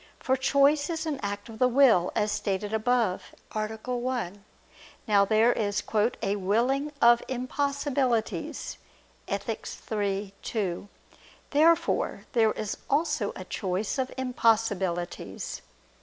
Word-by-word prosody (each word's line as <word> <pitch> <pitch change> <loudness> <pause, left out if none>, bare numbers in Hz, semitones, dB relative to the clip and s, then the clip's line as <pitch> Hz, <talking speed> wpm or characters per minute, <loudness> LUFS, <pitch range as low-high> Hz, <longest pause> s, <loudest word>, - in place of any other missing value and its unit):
For 260 - +1
choice 280 +3 +3
is 330 -1 -2
an 300 -4 -2
act 205 0 -4
of 220 -1 -10
the 255 - +5
will, 245 -9 +4
as 210 -1 +1
stated 205 +1 -2
above 220 -3 0 0.2
(A. 215 0 -1
1). 235 -3 -4 0.6
Now 200 -2 +5
there 220 +3 +4
is 205 -2 -1 0.4
"a 200 +1 0
willing 245 +9 +1
of 235 0 +6
impossibilities" 260 -2 -1 0.5
(Ethic. - - -3 0.2
iii, 200 -2 -1
2). 200 -3 -3 0.6
Therefore 320 +3 +2
there 225 -3 +4
is 215 - -4
also 305 +4 +1
a - - -7
choice 200 +4 -2
of 260 0 -1
impossibilities. 220 -8 -1
225 Hz, 115 wpm, -27 LUFS, 205-260 Hz, 0.6 s, of